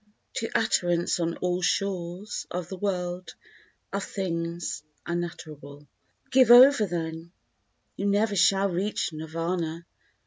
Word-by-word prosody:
To 225 - -2
utterance 175 -6 +1
on 170 0 -1
all 180 0 0
shores 190 +1 -2
of 175 -1 -4
the 190 - -5
world 180 -2 -3 0.6
Of 200 0 -1
things 170 -4 -3 0.2
unutterable. 155 -4 -6 0.4
Give 260 -2 +5
over 245 -2 +8
then, 165 0 -5 0.6
you 200 - -1
never 205 +1 +2
shall 195 +1 +3
reach 185 -1 -1
Nirvana! 165 +1 -3
175 Hz, 110 wpm, -27 LUFS, 170-200 Hz, 0.6 s, over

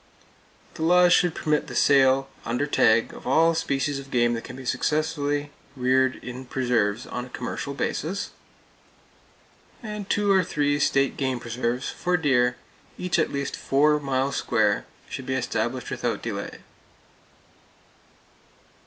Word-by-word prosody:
The - - -9
laws 180 +2 +5
should 175 -2 +3
permit 150 -1 0
the - - -7
sale, 135 -1 +4 0.2
under 120 +5 -1
tag, 115 -5 +3
of - - -10
all 165 +5 +4
species 140 -3 -1
of 135 0 -10
game 120 -2 +2
that 115 - -4
can 130 +1 -9
successfully 145 +1 -1 0.2
be 130 - -12
reared 130 +1 +3
in 130 +1 -7
preserves 120 -4 0
on 125 - -5
a - - -13
commercial 130 +3 -5
basis. 180 +7 -3 1.8
Two 205 -1 +2
or 190 -1 +4
three 145 -3 0
state 135 -1 +2
game 130 -3 -1
preserves, 120 +2 -2
for 180 0 0
deer, 125 -6 +2 0.4
each 180 -1 0
at 160 - +1
least 140 0 -3
four 150 +2 +2
miles 135 -1 -1
square, - - +1 0.2
should - - -7
be - - 0
established - - -2
without - - -2
delay. - - -5
140 Hz, 135 wpm, -25 LUFS, 125-150 Hz, 1.8 s, laws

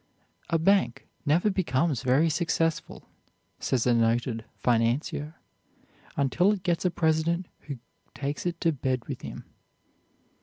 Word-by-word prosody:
"A 165 - +3
bank 195 +4 +2 0.2
never 175 +8 +3
becomes 160 -6 +1
very 135 +5 +3
successful," 165 0 -1 0.5
says 125 -3 0
a 125 - +4
noted 115 0 +1
financier, 125 +7 0 0.8
"until 170 +8 +3
it 195 -3 -5
gets 175 -3 0
a - - +5
president 165 +1 +1 0.2
who 140 -3 -4 0.4
takes 145 +5 -3
it 170 -1 -3
to 165 - +3
bed 130 -4 -2
with - - -5
him." - - -8
155 Hz, 125 wpm, -27 LUFS, 130-170 Hz, 0.8 s, a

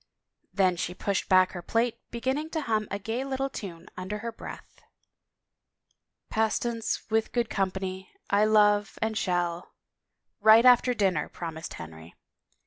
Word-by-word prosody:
Then 185 -3 +2
she 180 +1 -3
pushed 200 0 -2
back 185 0 +5
her 175 - -6
plate, 230 +5 0
beginning 265 +6 -2
to - - 0
hum 215 -5 0
a 200 - -2
gay 225 +6 -3
little 270 0 -2
time 175 -9 -8
under 185 +3 -4
her 230 +2 -5
breath. 225 - -11 1.5
Pastance 225 +1 0
with 220 0 +1
good 240 -2 -1
company 190 -1 -3 0.2
I 205 +1 +3
love, 210 -1 +3
and 220 0 -1
shall 175 -3 -1 0.2
— - - -58
" - - -55
Right 220 +3 +7
after 250 0 +6
dinner," 190 -8 +1
promised 165 -1 -7
Henry. 80 0 -11
210 Hz, 145 wpm, -27 LUFS, 185-230 Hz, 1.5 s, Right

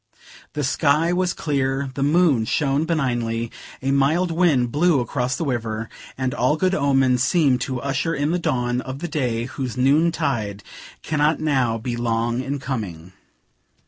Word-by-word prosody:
The 150 - -2
sky 150 +4 +2
was 180 0 0
clear, 135 -2 -1
the 135 - -4
moon 145 -5 +3
shone 140 +5 +1
benignly, 120 -8 -1 0.3
a 135 - +1
mild 155 +6 +2
wind 155 -8 +2
blew 160 +1 +3
across 125 +1 -1
the 165 - -3
river, 115 -4 -3 0.3
and 130 -1 -1
all 130 +5 +1
good 185 +3 +1
omens 135 -5 +2
seemed 135 -3 +3
to 130 -2 -2
usher 140 +5 -1
in 145 +3 0
the 180 - 0
dawn 125 -5 0
of 130 0 -6
the 175 - -4
day 125 -8 -1
whose 130 -2 -5
noontide 130 -7 +1 0.4
cannot 155 0 +1
now 130 -7 +1
be 120 +1 -4
long 120 +1 -1
in 135 +2 -3
coming. 95 -11 -5
135 Hz, 155 wpm, -22 LUFS, 120-150 Hz, 0.4 s, moon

